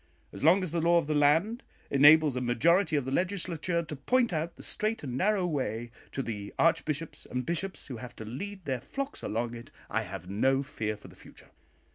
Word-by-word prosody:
As - - -8
long 180 +5 +6
as 180 - -3
the 170 0 0
law 170 +1 +4
of 170 - +2
the 155 - -1
land 160 - +3 0.3
enables 145 0 +7
a 125 - -1
majority 160 - +3
of 140 -3 +1
the 130 - -3
Legislature 175 0 -1
to 150 -1 -7
point 235 - +1
out 160 +2 -2
the - - -12
straight 215 -2 -2
and 125 -4 -4
narrow 195 +5 +2
way 120 -8 -2 0.2
to 135 - -3
the 105 -4 -5
archbishops 160 -1 0
and 125 0 -3
bishops 185 +3 -2
who 130 -4 -6
have 120 +1 -9
to 110 - -8
lead 190 - -6
their 130 -3 -2
flocks 275 - -5
along 115 +2 -2
it, 115 0 -9 0.2
I 110 - +1
have 95 -3 -7
no 135 +8 +2
fear 110 -6 -3
for 105 - -14
the - - -15
future. - - -15
150 Hz, 210 wpm, -29 LUFS, 120-175 Hz, 0.3 s, enables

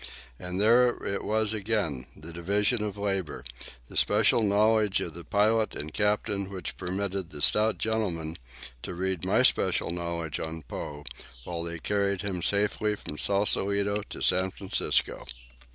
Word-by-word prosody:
And 90 +1 -4
there 120 +3 +5
it 100 - -2
was 110 0 +1
again, 100 - -1
the 80 +2 -10
division 105 +6 +1
of 105 -1 -4
labour, 95 -6 -2 0.4
the - - -13
special 105 +2 +4
knowledge 105 0 +3
of 85 - -4
the 85 +1 -8
pilot 110 +3 +2
and 75 +1 -6
captain 105 -1 0
which 95 -3 -6
permitted 95 0 -3
the 75 - -8
stout 105 +9 +4
gentleman 90 -8 -2 0.4
to 90 - -6
read 95 -2 -2
my - - +3
special - - +3
knowledge 85 -2 -3
on 80 0 -5
Poe 75 +3 -7 0.4
while 85 +2 -4
they 85 0 -4
carried 100 +2 0
him 95 -3 -2
safely 105 +2 +1
from 75 -6 -8
Sausalito 100 0 +1
to - - -8
San 95 +1 +3
Francisco. 95 0 -1
100 Hz, 150 wpm, -28 LUFS, 85-105 Hz, 0.4 s, there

